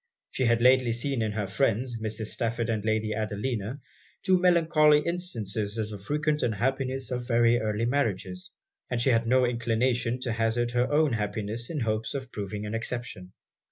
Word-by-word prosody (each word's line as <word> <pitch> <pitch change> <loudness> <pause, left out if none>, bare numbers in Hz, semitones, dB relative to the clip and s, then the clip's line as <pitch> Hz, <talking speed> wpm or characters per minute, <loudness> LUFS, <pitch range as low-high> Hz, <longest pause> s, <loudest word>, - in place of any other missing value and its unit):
She 130 - 0
had 115 0 +2
lately 125 -2 +5
seen 125 +1 -1
in 110 -1 -1
her 105 -1 -2
friends, 115 +3 0
Mrs. 110 0 -3
Stafford 115 -1 -2
and 110 -2 -2
Lady 110 0 0
Adelina, 110 +3 -3 0.4
two 185 -2 +3
melancholy 160 -4 +4
instances 115 - -3
of 110 -1 -2
the 105 - -7
frequent 150 +3 0
unhappiness 130 +3 -1
of 125 -1 -3
very 120 0 +4
early 110 +1 -1
marriages; 100 -9 -2 0.4
and 125 - -1
she 130 +3 +3
had 115 -1 +2
no 130 +1 +4
inclination 120 +1 0
to 125 - -2
hazard 115 +2 0
her 125 +2 +1
own 150 -2 +3
happiness 110 +2 -3
in 155 -4 -3
hopes 110 +1 -1
of 130 -2 -5
proving 105 0 -5
an 105 - -5
exception. 115 -5 -5
115 Hz, 170 wpm, -27 LUFS, 110-130 Hz, 0.4 s, lately